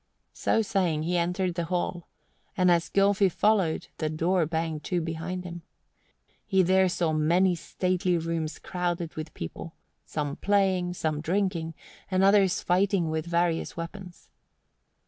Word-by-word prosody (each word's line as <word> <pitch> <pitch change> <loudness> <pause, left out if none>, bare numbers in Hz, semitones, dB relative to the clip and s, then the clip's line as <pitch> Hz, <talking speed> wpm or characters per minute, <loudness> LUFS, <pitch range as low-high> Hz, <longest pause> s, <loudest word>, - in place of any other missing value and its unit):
So 225 - +1
saying 180 -7 0
he 175 +2 -1
entered 180 +1 0
the 170 -1 -2
hall, 175 0 -2 0.5
and 180 -1 +4
as 170 -1 +2
Gylfi 200 0 +3
followed 195 -5 +1
the 155 - 0
door 165 +2 +1
banged 160 -1 -2
to 180 - 0
behind 165 +2 -4
him. 175 -1 -7 0.8
He 190 -2 +3
there 190 +1 +4
saw 170 -2 0
many 170 +5 +3
stately 180 +1 -1
rooms 165 -1 -3
crowded 175 -2 -3
with 155 0 -6
people, 120 - -7 0.3
some 145 -2 -4
playing, 190 -3 +1
some 155 -3 -1
drinking, 170 -2 -1 0.3
and 185 0 +2
others 195 -2 +4
fighting 180 -2 +2
with 160 +1 -2
various 170 -1 0
weapons. 180 +1 -8
175 Hz, 140 wpm, -27 LUFS, 165-185 Hz, 0.8 s, and